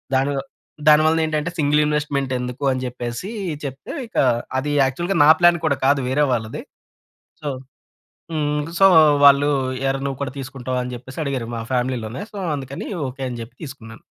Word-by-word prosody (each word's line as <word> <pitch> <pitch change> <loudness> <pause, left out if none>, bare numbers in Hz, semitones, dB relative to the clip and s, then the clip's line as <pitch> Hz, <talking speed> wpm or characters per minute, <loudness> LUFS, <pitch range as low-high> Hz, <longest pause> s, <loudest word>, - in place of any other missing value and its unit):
దాని 135 +2 +2 0.6
దాని 150 0 +8
వల్ల 160 +1 +3
ఏంటంటే 155 +1 -1
సింగిల్ 150 -1 +3
ఇన్వెస్ట్‌మెంట్ 145 -3 -1
ఎందుకు 125 +2 -5
అని 130 -1 -2
చెప్పేసి, 120 +7 -5 0.3
చెప్తే 135 -1 -6
ఇక - - -9 0.4
అది 145 +3 -1
యాక్చువల్‌గా 170 +9 -1
నా - - +6
ప్లాన్ 175 0 +5
కూడా 150 -3 +2
కాదు 140 0 +4
వేరే 145 +3 +2
వాళ్ళది. 110 -2 -3 0.8
సో 150 - -4 0.8
హ్మ్, 150 -1 0 0.2
సో, 195 - +7 0.4
వాళ్ళు, 140 +1 +7 0.4
"ఏరా! 135 0 0
నువ్వు 135 -2 -3
కూడా 135 -2 -3
తీసుకుంటావా?" 130 -2 -4
అని 125 - -6
చెప్పేసి 125 +4 -10
అడిగారు 135 -5 -2
మా 115 - -4
ఫ్యామిలీ‌లోనే. 125 - -2
సో, 205 - -7 0.2
అందుకని 135 -1 -6 0.2
ఓకే 135 +1 -8
అని 120 -1 -6
చెప్పి 115 +2 -9
తీసుకున్నాను. 115 -6 -10
135 Hz, 160 wpm, -21 LUFS, 125-150 Hz, 0.8 s, దాని